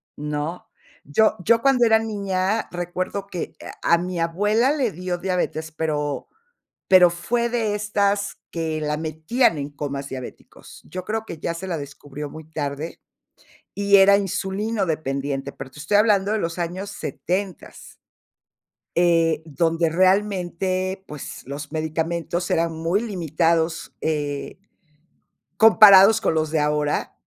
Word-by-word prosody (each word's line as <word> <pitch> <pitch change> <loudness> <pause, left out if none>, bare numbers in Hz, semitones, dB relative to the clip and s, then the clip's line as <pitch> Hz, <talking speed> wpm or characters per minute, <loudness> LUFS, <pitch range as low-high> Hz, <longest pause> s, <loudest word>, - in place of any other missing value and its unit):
¿no? 150 +3 -4 0.4
Yo 215 +10 +3
yo 230 +4 +3
cuando 265 -3 +4
era 220 0 +6
niña 200 -1 -1
recuerdo 180 +3 -3
que, 180 -4 -6
eh, - - -8
a 170 - +4
mi 180 0 -4
abuela 210 +10 +2
le 260 -7 0
dio 180 0 -4
diabetes, 175 -3 -2
pero 150 -2 -2 0.6
pero 180 -2 +8
fue 235 +8 -1
de 225 -3 0
estas 205 -1 0
que 160 -2 -3
la 150 0 -1
metían 160 - +1
en 140 0 -4
comas 140 -1 -5
diabéticos. 130 -2 -10
Yo 185 0 -6
creo 220 +1 -3
que 170 - -7
ya 170 - -3
se 180 +3 -7
la 175 -3 -2
descubrió 145 0 -8
muy 160 +2 -10
tarde, 145 +1 -4 0.7
y 200 0 +4
era 200 +1 +7
insulinodependiente, 170 -9 -2
pero 135 0 -9
te 130 - -15
estoy 165 +7 +1
hablando 205 -2 +3
de 220 - +1
los 165 -2 -3
años 180 +4 -4
setentas 180 +3 -5 1.0
eh, 165 -2 +3
donde 165 +2 +1
realmente, 185 0 0
pues, 150 -6 -8
los 145 +3 -7
medicamentos 165 +2 -2
eran 165 0 +1
muy 165 +5 -1
limitados, 165 -5 0
eh 145 -2 -3 1.0
comparados 215 -2 +8
con - - 0
los 155 -1 0
de 160 - +1
ahora, 150 0 0
175 Hz, 135 wpm, -23 LUFS, 155-200 Hz, 1.0 s, pero